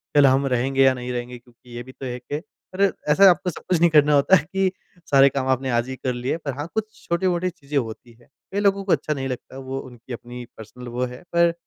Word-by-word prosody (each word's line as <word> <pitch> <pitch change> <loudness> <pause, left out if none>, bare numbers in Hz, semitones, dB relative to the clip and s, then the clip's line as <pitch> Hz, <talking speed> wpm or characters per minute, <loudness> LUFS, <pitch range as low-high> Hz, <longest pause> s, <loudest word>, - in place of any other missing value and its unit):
कल 145 -1 +7
हम 135 +1 +3
रहेंगे 135 +1 +2
या 135 -1 +5
नहीं 125 0 -5
रहेंगे। 125 0 -5
क्योंकि 120 0 -17
ये 120 - -5
भी 130 - -12
तो 135 - -9
है 125 -1 -4
के 145 +4 -5 0.4
अरे! 195 +1 +3 0.2
ऐसा 195 +6 +7
आपको 180 0 +2
सब 175 - -9
कुछ 180 - +3
नहीं 170 +1 +5
करना 150 -1 +5
होता 145 +6 +5
है 155 - +2
कि 190 -1 +2 0.4
सारे 135 -1 +7
काम 135 -1 -2
आपने 130 0 0
आज 120 +1 0
ही 130 - -4
कर 130 -1 -3
लिए 125 +5 -2
पर 145 -5 -5
हाँ, 145 +2 -4
कुछ 220 0 -4
छोटी-मोटी 175 +1 0
चीज़ें 150 -5 -5
होती 120 -1 -4
है। 120 +1 -23 0.3
कई 200 - -1
लोगों 200 -1 +2
को 195 - -2
अच्छा 155 - +1
नहीं 135 -2 -4
लगता 130 0 -7
वो 135 0 -5
उनकी 125 -1 -10
अपनी 120 +1 -8
पर्सनल 120 +3 -10
वो 120 +1 -2
है। 125 0 -9
पर 170 0 +4
135 Hz, 250 wpm, -23 LUFS, 125-170 Hz, 0.4 s, कल